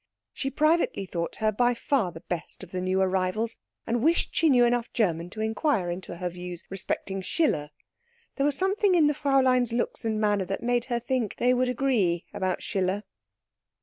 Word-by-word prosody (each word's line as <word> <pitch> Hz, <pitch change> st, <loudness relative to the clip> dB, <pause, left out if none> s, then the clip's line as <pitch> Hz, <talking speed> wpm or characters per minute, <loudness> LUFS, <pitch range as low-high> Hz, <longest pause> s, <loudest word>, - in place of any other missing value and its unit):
She 270 Hz, -, -2 dB
privately 305 Hz, -, +2 dB
thought 170 Hz, -2 st, -4 dB
her 215 Hz, 0 st, +1 dB
by 245 Hz, +3 st, +2 dB
far 230 Hz, -7 st, 0 dB
the 165 Hz, -1 st, -11 dB
best 175 Hz, +1 st, -5 dB
of 185 Hz, -, -11 dB
the 185 Hz, -, -3 dB
new 185 Hz, +1 st, 0 dB
arrivals, 190 Hz, +4 st, 0 dB, 0.3 s
and 235 Hz, 0 st, 0 dB
wished 330 Hz, +6 st, +2 dB
she 325 Hz, -, +4 dB
knew 245 Hz, -3 st, +6 dB
enough 240 Hz, -1 st, 0 dB
German 175 Hz, -7 st, 0 dB
to 215 Hz, +4 st, -6 dB
inquire 220 Hz, -, 0 dB
into 175 Hz, -1 st, -6 dB
her 180 Hz, 0 st, -2 dB
views 180 Hz, 0 st, -7 dB
respecting 195 Hz, 0 st, -3 dB
Schiller; 185 Hz, -, 0 dB, 0.7 s
there 275 Hz, -, +1 dB
was 290 Hz, -, 0 dB
something 385 Hz, 0 st, +2 dB
in 325 Hz, -3 st, +5 dB
the 295 Hz, -, +3 dB
Fräulein's 260 Hz, -4 st, +2 dB
looks 235 Hz, 0 st, -2 dB
and 220 Hz, -1 st, -1 dB
manner 205 Hz, -3 st, +1 dB
that 195 Hz, +5 st, -4 dB
made 240 Hz, 0 st, +1 dB
her 240 Hz, -2 st, -1 dB
think 240 Hz, -3 st, -1 dB
they 250 Hz, +1 st, +3 dB
would 250 Hz, 0 st, +1 dB
agree 230 Hz, -10 st, +1 dB
about 185 Hz, -1 st, -2 dB
Schiller. 190 Hz, +1 st, -1 dB
220 Hz, 185 wpm, -27 LUFS, 185-255 Hz, 0.7 s, knew